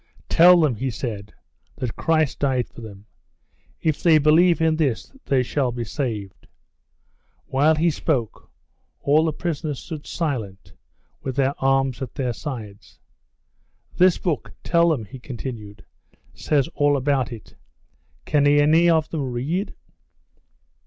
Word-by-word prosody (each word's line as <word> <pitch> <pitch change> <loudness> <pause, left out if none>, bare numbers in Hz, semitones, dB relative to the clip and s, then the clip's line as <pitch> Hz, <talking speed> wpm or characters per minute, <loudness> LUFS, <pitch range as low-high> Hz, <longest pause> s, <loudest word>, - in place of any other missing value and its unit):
"Tell 175 +1 +7
them," 150 -5 +2
he 130 +4 -2
said, 110 -4 -5 0.4
"that 125 -4 -4
Christ 155 -3 0
died 130 -4 0
for - - -14
them. 100 -2 -11 0.8
If 155 -3 0
they 165 -3 +5
believe 160 +4 +4
in 160 -1 +2
this 140 -8 -1
they 130 -2 +2
shall 130 0 -1
be 120 0 -4
saved." 110 -5 -5 1.0
While 145 +4 +2
he 165 +2 +2
spoke, 130 -8 -2 0.5
all 150 +3 +3
the 160 - +1
prisoners 155 -3 -4
stood 155 +1 -8
silent 115 - -4 0.5
with 130 -2 -4
their 135 0 +1
arms 135 -1 +1
at 130 - -6
their 125 -4 -2
sides. 110 -7 -8 1.0
"This 185 -1 +4
book, 165 -7 -3
tell 170 0 +3
them," 135 -9 -1
he 130 +5 -11
continued, 115 -5 -8 0.5
"says 140 -3 0
all 145 -1 +1
about 135 -2 0
it. 115 -3 -10 0.7
Can 145 -2 +2
any 150 +4 +4
of 160 -2 +2
them 140 -6 -3
read?" 155 - -3
140 Hz, 135 wpm, -22 LUFS, 120-155 Hz, 1.0 s, Tell